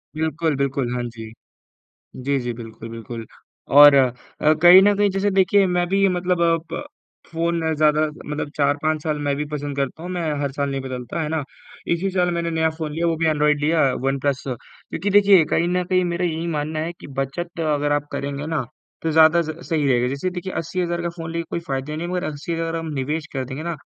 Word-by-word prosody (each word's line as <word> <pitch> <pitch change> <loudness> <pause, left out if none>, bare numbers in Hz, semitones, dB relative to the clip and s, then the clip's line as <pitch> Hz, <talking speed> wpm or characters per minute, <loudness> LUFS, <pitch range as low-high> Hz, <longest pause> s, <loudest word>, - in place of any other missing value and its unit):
बिल्कुल, 160 0 -1
बिल्कुल, 135 -3 -1
हाँ 125 - -2
जी। 115 -2 -8 0.9
जी, 140 0 +1
जी, 120 -1 -3
बिल्कुल, 115 -1 -9
बिल्कुल। 115 0 -7 0.5
और 145 +1 +9
अ, 130 -3 +4 0.5
कहीं 175 +2 +10
न 205 +1 +4
कहीं, 205 -1 +3
जैसे 195 +2 0
देखिए, 195 +1 +4
मैं 180 -1 +1
भी 195 +1 +3
मतलब 175 -2 +1
प - - -3 0.5
फ़ोन 170 0 0 0.2
ज़्यादा 150 0 +3 0.3
मतलब 150 0 -4
4-5 150 +1 +1
साल 155 -1 -1
मैं 140 - +1
भी 150 - -2
पसंद 145 -1 -4
करता 140 +3 -3
हूँ, 180 - -6
मैं 180 -1 -2 0.2
हर 140 -1 -2
साल 140 0 -2
नहीं 135 0 -2
बदलता। 130 +3 -5
है 150 - -2
ना? 160 -2 -1 0.5
इसी 190 +3 0
साल 180 -1 +1
मैंने 170 0 -1
नया 160 0 +1
फ़ोन 160 -1 -5
लिया, 170 +2 -1
वो 165 -1 +1
भी 165 +1 0
ऐन्ड्रॉइड 150 -1 +2
लिया, 155 +2 +2 0.2
वनप्लस। 135 0 0
क्योंकि 145 - -5
देखिए, 195 -4 +6
कहीं 170 - +2
न 180 0 0
कहीं 185 0 +1
मेरा 175 0 -1
यही 165 -1 -2
मानना 155 -1 -2
है 165 +2 -3
कि - - -9
बचत 170 +6 -4
अगर 145 -2 +1
आप 145 0 0
करेंगे 140 +1 -4
ना, 160 -4 -1 0.4
तो 165 - 0
ज़्यादा 160 +2 +5
स 160 -1 -5
सही 155 -4 +1
रहेगा। 125 -1 +2
जैसे 140 +8 -2
देखिए, 180 +1 -5
80,000 170 +1 -2
का 170 - -1
फ़ोन 165 -1 -6
लेके 170 0 -2
कोई - - -2
फ़ायदा 135 +3 -3
नहीं, 170 +2 -4
मगर 180 0 -2
80,000 165 +2 -3
हम 165 -1 -4
निवेश 150 +4 -2
कर 135 -2 -2
देंगे 130 +4 -6
ना, 170 +1 -3
160 Hz, 210 wpm, -22 LUFS, 140-170 Hz, 0.9 s, कहीं